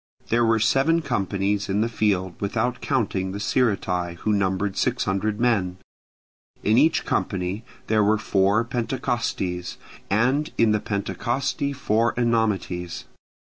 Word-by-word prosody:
There 120 +1 +3
were 115 0 +3
seven 145 +9 +2
companies 100 - -1
in 100 +2 +1
the 115 - +2
field 100 -5 0
without 115 +5 -1
counting 95 -6 -1
the 100 - -4
Sciritae, 95 -7 0
who 105 +5 -1
numbered 95 0 0
six 125 +3 0
hundred 105 +2 -1
men: 100 -7 +1 0.9
in 110 +4 +4
each 160 +3 +3
company 95 +3 -2 0.2
there 110 -1 +2
were 105 +1 +3
four 100 +1 +2
Pentecostyes, 115 -7 -2 0.3
and 130 +9 +1
in 115 -2 +4
the 105 - +2
Pentecosty 120 +8 -2
four 115 -4 +1
Enomoties. 105 -7 -1
105 Hz, 130 wpm, -24 LUFS, 95-120 Hz, 0.9 s, in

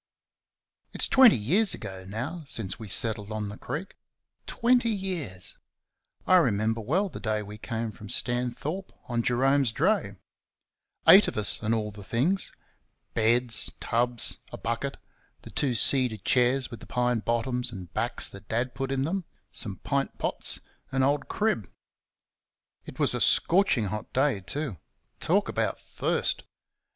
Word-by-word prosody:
It's - - +2
twenty 260 - +7
years 180 - +3
ago 95 -1 -8
now 130 - -5
since 110 -8 0
we 110 - -8
settled 105 +1 +3
on 105 -1 -3
the 105 - -8
Creek. 150 +10 -6 0.5
Twenty 245 0 +2
years! 180 - -3 0.7
I 185 - +6
remember 115 - +1
well 170 - 0
the 170 - -8
day 110 -2 -1
we 105 +1 -10
came 115 0 -4
from 105 -1 -12
Stanthorpe, 125 - -2 0.2
on 120 -1 0
Jerome's 135 +1 +2
dray 165 - 0 0.9
eight 200 +2 +9
of - - -4
us, 105 -1 +5
and 110 +1 +1
all 105 -1 -2
the 100 0 -11
things 145 - 0 0.6
beds, 115 +1 +2
tubs, 120 0 +1
a - - -7
bucket, 115 +4 -3 0.5
the - - -11
two 130 -4 0
cedar 125 -1 +3
chairs 125 +5 +1
with 115 - -8
the - - -13
pine 125 -1 0
bottoms 120 +2 -1
and 90 -5 -9
backs - - -1
that 100 +1 -13
Dad 120 +2 -1
put 135 -1 -4
in 135 0 0
them, 180 +4 -2 0.3
some 100 -5 -1
pint 140 -1 -1
pots - - +1 0.3
and 135 -1 +1
old 140 +1 +1
Crib. 205 - -1 1.2
It - - -10
was - - +2
a - - -2
scorching 175 - +4
hot 105 +2 -5
day, 135 -4 +2
too 135 - -4 0.4
talk - - +1
about - - -1
thirst! - - -1
120 Hz, 150 wpm, -27 LUFS, 110-145 Hz, 1.2 s, eight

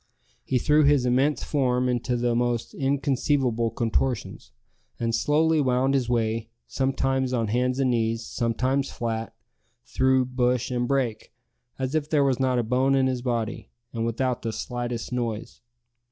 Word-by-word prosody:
He 130 - 0
threw 150 +4 +3
his 145 -3 +4
immense 130 +4 +2
form 125 -3 +1
into 125 0 0
the 120 0 +1
most 120 -1 -1
inconceivable 135 -3 0
contortions, 115 - -2 0.5
and 115 -1 -1
slowly 155 +5 +2
wound 130 0 +2
his 130 -3 0
way, 115 -1 0 0.2
sometimes 135 -1 0
on 115 -3 0
hands 125 +3 +1
and 130 -2 +2
knees, 115 -1 0
sometimes 130 +4 -1
flat, 115 -1 -4 0.5
through 130 0 +2
bush 125 0 0
and 120 -1 0
brake, 130 -5 -1 0.5
as 130 +1 -3
if 155 -1 -1
there 150 -3 +3
was 135 -2 +1
not 130 -1 +1
a 120 - +1
bone 130 +4 +2
in 135 -1 +3
his 130 -1 -1
body, 120 -3 -3 0.2
and 115 -1 -2
without 120 +2 -1
the 115 - -2
slightest 120 +1 -4
noise. 115 -3 -4
125 Hz, 155 wpm, -25 LUFS, 115-135 Hz, 0.5 s, his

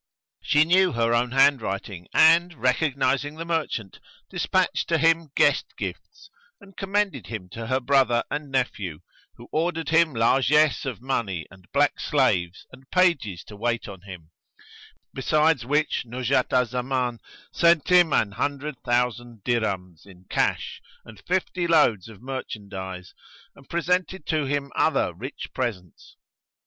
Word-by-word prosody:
She 150 +1 +4
knew 185 +1 +3
her 115 0 +1
own 120 +1 +2
handwriting 110 -9 +1
and, 170 +2 +5
recognising 135 +2 0
the 165 +1 -6
merchant, 155 - -3 0.3
despatched - - 0
to 165 - +2
him 165 0 +2
guest - - +2
gifts - - -8 0.3
and 195 -2 -17
commended 195 - -1
him 110 -5 -6
to 115 +5 -7
her 130 +2 +1
brother 130 -2 +2
and 145 0 -4
nephew, 105 - -2 0.3
who - - -13
ordered 165 +1 -1
him 160 -3 +3
largesse 135 +7 +3
of 125 -3 -5
money 100 - -2
and 95 -1 -18
black - - +2
slaves 85 0 0
and 130 +1 -16
pages 145 - +1
to 105 - -12
wait 120 +2 -2
on 95 -3 -10
him; 90 -4 -11 0.8
besides 150 -1 +1
which 150 +2 +1
Nuzhat 125 +2 -1
al 125 0 +3
Zaman 125 0 -2 0.3
sent 170 -2 +3
him 175 -3 +5
an 100 - +2
hundred 140 +4 -3
thousand 120 -3 -1
dirhams 95 -8 -2
in 95 -1 -16
cash - - -1 0.2
and 110 -3 -14
fifty 180 -1 -1
loads 120 - +3
of 110 0 -14
merchandise 100 -8 -7 0.4
and 140 - -19
presented 180 +1 -1
to 155 -2 0
him 140 0 -2
other 155 - +1
rich 120 - -7
presents. 105 - -5
130 Hz, 140 wpm, -24 LUFS, 110-155 Hz, 0.8 s, and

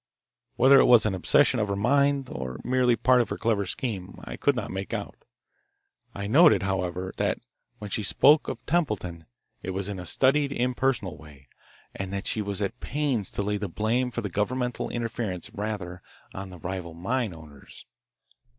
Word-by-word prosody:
Whether 135 +2 +7
it - - +6
was 120 -3 +6
an 105 - +1
obsession 125 +7 +3
of 105 - 0
her 100 - -1
mind, 140 +5 +2
or 65 -1 -5
merely 125 -1 +2
part 125 +1 +4
of 115 - -3
her - - -3
clever 105 -4 0
scheme, 95 -4 -4
I - - -6
could - - +1
not - - -4
make 95 +1 -4
out. - - -5 1.0
I 100 - -4
noted, 135 - +5
however, 95 -1 -2
that - - 0 0.4
when 105 -1 -8
she 110 - -1
spoke 145 +9 +4
of - - -6
Templeton 100 - -1 0.4
it - - -6
was 95 0 -1
in 100 -2 -5
a 90 - -5
studied, 140 - +2
impersonal 125 -6 -1
way, 70 -4 -16 0.4
and 95 -1 -5
that 100 0 -3
she 110 - +1
was 100 0 -2
at 115 +5 -4
pains 140 -7 -1
to 100 - -3
lay 105 +1 -1
the 100 -1 -4
blame 115 +7 0
for 120 -1 -4
the 105 - -4
governmental 125 +6 -2
interference 115 -6 -4
rather 100 -4 -5 0.3
on 95 0 -6
the 90 - -10
rival 85 0 -6
mine 115 +6 -1
owners. 75 -4 -14
105 Hz, 180 wpm, -26 LUFS, 95-125 Hz, 1.0 s, Whether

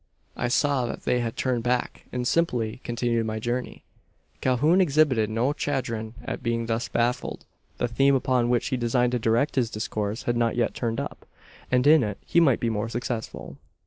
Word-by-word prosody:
I 120 - -1
saw 130 0 +1
that - - -6
they 125 - +1
had 115 -2 -3
turned 125 -3 0
back, 125 +1 -1
and 125 -1 -2
simply 125 -9 0
continued 120 -1 -1
my 110 0 -2
journey." 120 +3 -3 0.6
Calhoun 150 +9 +3
exhibited 140 - +3
no 120 +6 +1
chagrin 120 -7 -3
at 130 - -4
being 115 0 -1
thus 115 +1 -1
baffled. 120 +1 -1 0.3
The - - 0
theme 135 +4 +3
upon 125 -2 +1
which 120 -1 +1
he 130 - 0
designed 120 +1 +1
to 125 - 0
direct 115 +6 +1
his 120 -3 +2
discourse 110 +1 -3
had 120 0 0
not 115 -1 +1
yet 120 -1 +1
turned 115 -2 -2
up; - - -6 0.4
and 125 0 +3
in 155 +1 +7
it 105 -3 -2
he 170 - +3
might 140 -8 +4
be 115 - 0
more 110 +1 -2
successful. 120 -1 -5
120 Hz, 185 wpm, -26 LUFS, 115-130 Hz, 0.6 s, in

